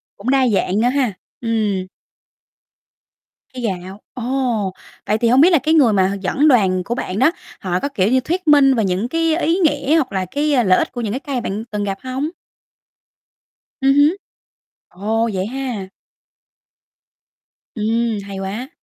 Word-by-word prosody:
cũng 215 +6 -5
đa 265 -1 +3
dạng 200 -1 +1
nữa 245 - +3
ha, 255 -6 0 0.3
ừm. 210 -5 -1 1.7
Cây 250 -1 -7
gạo, 190 -1 -4
ồ! 245 -5 -1 0.3
Vậy 215 +1 +1
thì 235 - +2
hông 255 +3 +5
biết 345 - +7
là 335 - +6
cái 310 +4 +1
người 260 -8 +5
mà 190 -2 +3
h 195 - -2
dẫn 280 +11 +2
đoàn 190 -8 +3
của 240 - -2
bạn 190 -5 -4
đó, 265 +6 +5 0.3
họ 180 -1 -1
có, 280 - -2
kiểu 200 -8 0
như, 260 - +4
thuyết 345 +5 -3
minh 280 -2 +6
về 225 -4 +1
những 190 +5 -1
cái 330 +2 +1
ý 335 +1 +1
nghĩa 295 -4 +2
hoặc 280 -6 0
là 190 -1 -1
cái, 295 +5 0
ơ, 245 - +4
lợi 185 -4 +4
ích - - -1
của 245 - -5
những 215 -3 -2
cái 260 - -3
cây 280 -2 -6
mà 250 - 0
bạn 215 -1 -4
từng 205 -1 -2
gặp 195 -1 -3
hông? 260 +4 -3 1.5
Ừm 270 0 +4
hứ. 295 +6 +4 0.7
Ồ, 220 +5 -1
vậy 190 0 -2
ha! 240 -6 -4 1.9
Ừm, 225 0 0
hay 195 -1 -7
quá! 205 +7 -5
235 Hz, 180 wpm, -19 LUFS, 200-275 Hz, 1.9 s, biết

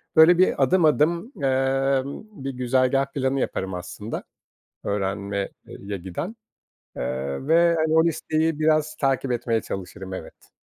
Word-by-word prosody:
Böyle, 165 +2 +8
bir 180 -6 +3
adım 170 +5 +4
adım, 170 - +2
emm, 135 +2 +1 0.2
bir 135 - -2
güzergâh 130 +1 +2
planı 135 0 0
yaparım 95 -5 -2
aslında 90 +5 -6 0.6
öğrenme 100 0 -2 0.2
eee, - - -10
ye 100 0 -5
giden, 95 - -5 0.6
eee, 65 - -3
ve, 170 +1 +5
hani, 155 0 +1
o 160 - +6
listeyi 160 -1 0
biraz 155 0 +2
takip 135 -2 0
etmeye 115 -2 0
çalışırım. 95 0 -6
Evet. - - -10
135 Hz, 135 wpm, -24 LUFS, 100-155 Hz, 0.6 s, Böyle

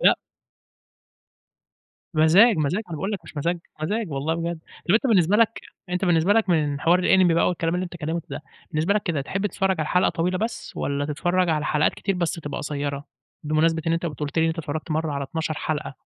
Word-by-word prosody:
لأ. - - +5 2.0
مزاج، 180 +8 +6
مزاج، 155 +8 0
أنا 165 - -5
باقول 195 +7 -3
لك 200 - -2
مش - - -13
مزاج، 170 +4 0 0.2
مزاج 210 +2 -1
والله 145 +4 -1
بجد، 170 0 -3 0.3
طب 175 - +4
أنت 235 +5 +3
بالنسبة 195 -4 +4
لك 230 0 +2 0.3
أنت 180 +2 -1
بالنسبة 175 +2 +3
لك 225 -3 +2
من 150 -4 +1
حوار 175 +3 +4
الأنمي 180 -2 +4
بقى 170 - +3
والكلام 170 -1 -1
اللي 180 +1 -1
أنت 175 - -9
اتكلّمته 165 0 -4
ده، - - -5 0.3
بالنسبة 160 +5 +1
لك 210 - +1
كده 160 -6 -1
تحب 195 +8 -2
تتفرّج 190 -1 0
على 155 - -2
حلقة 180 - +3
طويلة 180 +2 -1
بس، 225 +3 -4
والّا 140 0 -1
تتفرّج 175 +5 0
على 155 -2 +1
حلقات 150 0 +2
كتير 195 - -2
بس 175 -2 0
تبقى 145 -4 -5
قصيّرة؟ 145 -1 -3 0.4
بمناسبة 160 +2 +2
إن 165 - +2
أنت 170 +1 -1
كنت 150 -2 -6
قُلت 150 +2 -2
لي 160 - +4
إن 165 - +2
أنت 160 - -3
اتفرّجت 155 +1 -4
مرّة 155 -1 0
على 140 -1 -2
12 160 +2 -3
حلقة. 150 -2 -3
165 Hz, 215 wpm, -24 LUFS, 155-185 Hz, 2.0 s, مزاج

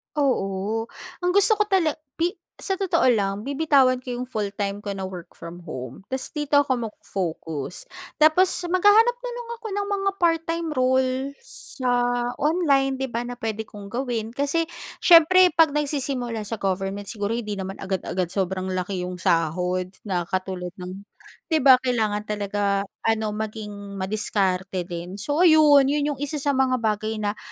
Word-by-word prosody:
Oo, 220 -5 0 0.3
ang 360 0 +1
gusto 410 +2 +5
ko 420 - +2
tala 370 -6 +2 0.2
pi 340 +2 +1 0.3
sa 385 - -2
totoo 380 -1 +1
lang, 200 0 -1
bibitawan 275 -3 +3
ko 250 -1 -5
yung 250 - -3
full-time 205 -3 -3
ko 210 - -6
na 195 -1 -4
work 180 -2 -9
from 170 +1 -9
home 130 -6 -7
tas 260 0 -4
dito 295 -1 +1
ako 260 -5 +1
magfo-focus. 165 -7 -5 0.3
Tapos 315 +5 +5 0.2
maghahanap 410 +7 +5
na - - -4
lang 480 -1 -7
ako 450 - -6
ng 405 0 -1
mga 395 0 +1
part-time 330 -1 0
role, 260 +1 +1
sa 260 - -5 0.5
online, 280 -4 +2
'di 265 - -1
ba? 230 - 0
Na 245 0 -6
puwede 220 -2 -3
kong 205 -2 -11
gawin, 235 -3 -2
kasi 285 +5 0 0.3
siyempre, 360 +1 +6
'pag 325 -1 +5
nagsisimula 275 -5 -2
sa 215 +2 -5
government 195 +1 -2
siguro 205 0 -3
hindi 215 -3 -4
naman 195 0 -5
agad-agad 185 -2 -3
sobrang 190 -1 -2
laki 185 0 -2
'yong 180 -1 -6
sahod, 180 +3 0
na 180 -4 -2
katulad 185 0 -4
ng 185 +2 -8 0.5
'di 315 - +3
ba? 260 -1 +8
Kailangan 220 -5 -1
talaga 205 -1 -1 0.2
ano, 220 -1 +1
maging 210 -2 -6
madiskarte 190 -2 -1
din. 175 +1 -6
So 295 - +2
ayun, 305 -4 +7
yun 295 0 +1
yung - - -18
isa 290 0 -3
sa 280 -1 +1
mga 255 -2 +2
bagay 215 0 -1
na 205 0 -2
225 Hz, 160 wpm, -24 LUFS, 195-290 Hz, 0.5 s, ba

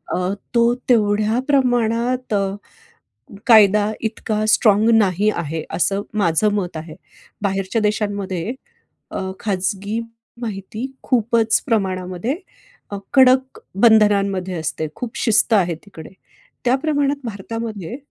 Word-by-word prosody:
अ, - - -1 0.4
तो 235 0 +4 0.2
तेवढ्या 215 0 +2
प्रमाणात 245 -2 +1
अ, 195 -1 0 0.9
कायदा 210 -2 +6
इतका 220 -1 -2
स्ट्राँग 215 0 +4
नाही 205 -1 +3
आहे, 160 -1 -3
असं 195 +3 0
माझं 205 +1 +2
मत 180 -5 -3
आहे. 155 0 -9 0.5
बाहेरच्या 195 +2 -1
देशांमध्ये 205 -1 -2 0.6
अ, - - -3 0.2
खाजगी 200 +2 -2 0.4
माहिती 215 +2 -5 0.2
खूपच 230 -2 +2
प्रमाणामध्ये 190 - -1 0.5
अ, 200 - -4 0.2
कडक 260 0 +4 0.2
बंधनांमध्ये 200 -4 +3
असते. 160 0 -3
खूप 240 -2 -6
शिस्त 225 0 +2
आहे 175 -4 +2
तिकडे. 160 -6 -11 0.5
त्या 250 +2 +3
प्रमाणात 290 -1 0
भारतामध्ये 220 -1 -5
210 Hz, 105 wpm, -20 LUFS, 195-235 Hz, 0.9 s, कायदा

